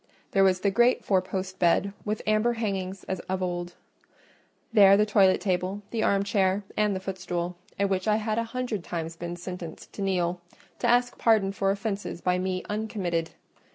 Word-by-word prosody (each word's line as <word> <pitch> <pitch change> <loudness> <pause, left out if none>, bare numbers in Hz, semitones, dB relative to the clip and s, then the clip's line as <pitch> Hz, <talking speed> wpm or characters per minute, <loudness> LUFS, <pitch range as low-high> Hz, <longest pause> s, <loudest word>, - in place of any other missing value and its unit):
There 195 - +4
was 185 -1 +3
the 200 - +2
great 240 +4 +3
four 190 -2 +3
post 185 0 -5
bed 185 +3 +3
with 210 0 -2
amber 215 +3 +2
hangings 195 -4 -3
as 190 - -3
of 190 0 -1
old; 175 -1 -3 1.0
there 200 -3 +7
the 210 - +4
toilet 195 -3 +4
table, 185 +2 -1
the 230 - -1
armchair, 200 -1 +2
and 210 -2 +2
the - - -2
footstool, 180 -2 -4 0.2
at 200 - +2
which 190 0 -1
I 210 - +4
had 215 +1 -1
a - - +1
hundred 230 -4 -3
times 165 -1 -4
been 175 +1 -5
sentenced 175 -2 -8
to - - -7
kneel, 180 -2 0 0.4
to - - 0
ask 245 0 +2
pardon 215 -4 +3
for 195 0 0
offences 200 -2 -3
by 180 +1 +1
me 185 0 -2
uncommitted. 200 -6 -2
195 Hz, 180 wpm, -27 LUFS, 180-210 Hz, 1.0 s, there